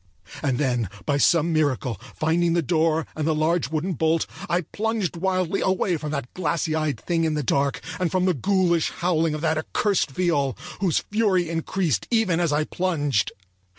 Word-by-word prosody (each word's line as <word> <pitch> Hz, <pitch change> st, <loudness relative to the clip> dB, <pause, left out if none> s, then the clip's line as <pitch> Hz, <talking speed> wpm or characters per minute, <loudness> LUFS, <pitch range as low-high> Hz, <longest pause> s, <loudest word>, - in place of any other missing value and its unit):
And 135 Hz, -4 st, 0 dB
then, 125 Hz, -7 st, 0 dB, 0.2 s
by 145 Hz, -2 st, +1 dB
some 165 Hz, +3 st, +3 dB
miracle, 130 Hz, -, 0 dB
finding 165 Hz, +2 st, +1 dB
the 170 Hz, -1 st, +2 dB
door 160 Hz, +1 st, +1 dB
and 155 Hz, -1 st, -2 dB
the 160 Hz, -, +2 dB
large 160 Hz, +1 st, +1 dB
wooden 160 Hz, +4 st, -1 dB
bolt, 160 Hz, +1 st, +1 dB, 0.2 s
I 175 Hz, +2 st, +2 dB
plunged 215 Hz, +1 st, -2 dB
wildly 185 Hz, +1 st, 0 dB
away 185 Hz, -1 st, +1 dB
from 150 Hz, 0 st, -5 dB
that 140 Hz, -4 st, -4 dB
glassy 165 Hz, -2 st, -1 dB
eyed 155 Hz, -2 st, -1 dB
thing 170 Hz, -2 st, 0 dB
in 160 Hz, -1 st, +1 dB
the 150 Hz, -, -1 dB
dark, 140 Hz, +3 st, 0 dB, 0.2 s
and 180 Hz, -2 st, +1 dB
from 185 Hz, +1 st, +1 dB
the 185 Hz, -, +3 dB
ghoulish 175 Hz, +1 st, +2 dB
howling 165 Hz, -3 st, 0 dB
of 155 Hz, -, -5 dB
that 160 Hz, -1 st, +1 dB
accursed 195 Hz, +3 st, 0 dB
viol 140 Hz, -, 0 dB, 0.2 s
whose 180 Hz, -5 st, +1 dB
fury 200 Hz, -5 st, +2 dB
increased 165 Hz, -, -1 dB
even 220 Hz, -8 st, +2 dB
as 170 Hz, -3 st, +1 dB
I 150 Hz, +1 st, +2 dB
plunged. 145 Hz, -, 0 dB
165 Hz, 180 wpm, -24 LUFS, 150-180 Hz, 0.2 s, some